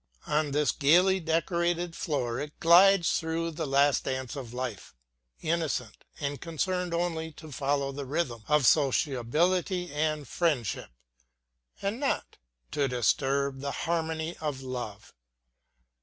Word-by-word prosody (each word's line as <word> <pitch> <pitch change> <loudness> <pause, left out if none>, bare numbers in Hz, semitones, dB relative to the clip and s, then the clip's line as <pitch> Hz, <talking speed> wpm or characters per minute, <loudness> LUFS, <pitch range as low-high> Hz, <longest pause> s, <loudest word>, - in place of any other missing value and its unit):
On 150 0 +1
this 145 -1 +2
gaily 180 +7 +4
decorated 170 +1 0
floor 125 -6 -2
it 145 +1 -7
glides 175 +1 +6
through 165 +1 -2
the 160 -1 -4
light 140 0 +3
dance 130 0 -3
of 130 -5 -7
life, 125 - -5 0.5
innocent, 155 -9 -2
and 140 -1 -3
concerned 180 +2 -2
only 165 -2 -1
to 155 0 -12
follow 140 0 0
the 140 0 -6
rhythm 130 -6 -2
of 150 -3 +3
sociability 155 - +2
and 155 -1 -1
friendship, 145 - -1 0.9
and 200 +5 -1
not 280 - -2 0.3
to 140 -1 +1
disturb 135 +2 +1
the 140 0 -2
harmony 160 0 -1
of 145 -4 -4
love. 120 -5 -6
150 Hz, 125 wpm, -29 LUFS, 135-170 Hz, 0.9 s, glides